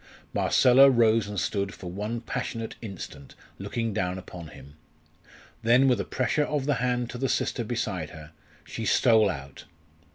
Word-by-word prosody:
Marcella 130 +2 +6
rose 115 -3 +3
and 105 -2 -3
stood 100 0 -2
for 90 -2 -8
one 105 +5 -4
passionate 115 -1 -4
instant 90 - -9 0.2
looking 115 -2 -3
down 95 -3 -1
upon 90 -2 -9
him. 70 -2 -13 0.9
Then, 125 +4 +4
with 125 -5 +3
a - - -2
pressure 130 +4 0
of 145 -3 -2
the 145 - +2
hand 125 -1 0
to 120 - -7
the 135 0 0
sister 120 - -1
beside 105 -8 -3
her, 80 -1 -12 0.3
she - - -6
stole 110 -3 +4
out. 70 -6 -7
110 Hz, 160 wpm, -27 LUFS, 95-125 Hz, 0.9 s, Marcella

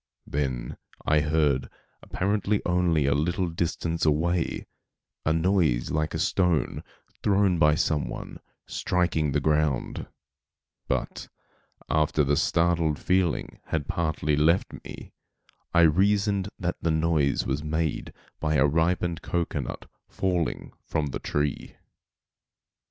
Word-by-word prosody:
Then 65 -4 -3 0.3
I 75 0 +4
heard, 75 -3 +1 0.3
apparently 100 +2 0
only 85 -4 +2
a 70 - +3
little 85 +5 0
distance 85 0 -2
away, 80 +3 +1 0.6
a - - +4
noise 80 -7 +2
like 80 0 -1
a - - 0
stone, 90 -4 +1 0.4
thrown 100 -3 +3
by 75 -1 +5
some 75 -3 0
one, - - -7 0.3
striking 85 -4 0
the 75 - +1
ground; 75 -3 0 0.8
but, - - -2 0.6
after 75 -1 +2
the 70 +1 +2
startled 85 -1 +2
feeling 90 -3 0
had 75 -3 -2
partly 80 -3 0
left 80 +5 +2
me - - -10 0.6
I 85 - +5
reasoned 100 +4 +3
that 90 -1 -2
the 85 - 0
noise 80 -3 +1
was 70 +3 -2
made 80 -1 -2 0.3
by 75 0 0
a 65 0 +5
ripened 85 +3 +1
cocoanut 85 -1 -3 0.2
falling 90 -4 -2
from 75 - -1
the - - -4
tree. 75 -1 -2
80 Hz, 120 wpm, -26 LUFS, 75-90 Hz, 0.8 s, by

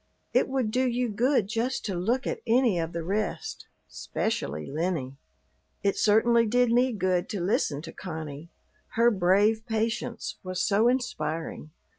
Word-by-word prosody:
It - - +3
would 260 -5 0
do 255 +3 +2
you 245 0 0
good 245 +2 +2
just 230 +4 -2
to 200 - -2
look 230 +9 0
at - - -3
any 230 -5 +3
of 165 0 -2
the 170 -1 -4
rest, 200 +2 -3 0.2
'specially 75 +2 -3
Lennie." 150 -4 -2 0.7
It 200 -1 +2
certainly 230 +2 +4
did 245 +1 +3
me 250 +2 +3
good 185 -4 0
to 205 - -3
listen 175 - 0
to 165 - -8
Connie, 160 -3 -7 0.5
her 235 +1 +5
brave 205 +3 +3
patience 230 +2 -2
was 185 -1 -4
so 210 +4 +3
inspiring. 165 -12 -2
210 Hz, 150 wpm, -27 LUFS, 175-235 Hz, 0.7 s, her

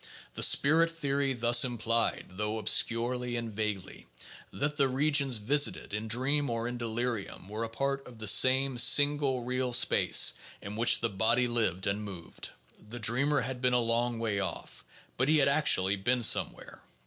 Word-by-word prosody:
The - - -7
spirit 160 +4 +4
theory 140 -4 -2
thus 120 0 +3
implied 115 -2 -2
(though 105 +3 -4
obscurely 120 +2 0
and 115 -2 -6
vaguely) 105 -3 -6 0.4
that 145 +1 -4
the 140 -2 +1
regions 140 -1 0
A - - -13
r - - -16
isited 145 -7 +1
in 105 +1 -5
dream 140 +5 0
or 115 0 -3
in 120 0 -6
delirium 115 -4 -5
were 105 +3 -6
a 115 - -5
part 135 +4 -4
of 120 -2 -14
the 110 - -8
same, 130 +4 +3
single, 140 0 +3
real 125 0 -3
space - - +4 0.3
in 100 +1 -9
which 115 +2 +3
the 115 - -1
body 115 +5 0
lived 110 -6 -1
and 100 +2 -3
moved; 95 -5 -8 0.4
the 120 - -8
dreamer 125 +6 +1
had 125 0 -6
been 125 -1 +1
a 125 - +2
"long 120 0 -1
way 110 -3 -3
off," 95 - -7 0.3
but 130 +3 0
he 155 - +3
had 140 - +2
actually 100 -9 +2
been 120 +5 -1
somewhere. - - 0
120 Hz, 175 wpm, -28 LUFS, 110-135 Hz, 0.4 s, spirit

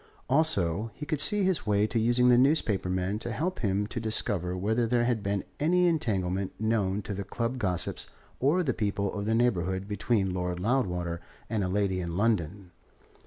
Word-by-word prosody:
Also, 115 - +1
he 150 - -6
could 155 -1 0
see 205 +5 +2
his 185 - 0
way 105 0 +3
to 115 +2 0
using 120 +2 +3
the 125 - +7
newspaper 125 - +2
men 95 +3 -1
to 120 - -4
help 170 +11 -2
him 100 -2 0
to 105 - -5
discover 100 -5 0
whether 110 +5 +1
there 120 0 +2
had 120 -3 0
been 100 -1 -1 0.2
any 180 +4 +3
entanglement 100 - -1
known 105 -3 0
to 100 - -4
the 100 0 -4
club 115 +5 -3
gossips 90 -6 -1 0.3
or 155 +8 +2
the 130 -6 0
people 100 -2 -1
of 100 0 -4
the 110 - +2
neighbourhood 95 -5 0
between 100 -1 0
Lord 90 -1 -2
Loudwater 90 -7 -1 0.3
and 110 -3 0
a - - 0
lady 95 -1 0
in 85 -1 -4
London. 100 -4 0
105 Hz, 185 wpm, -28 LUFS, 95-120 Hz, 0.3 s, the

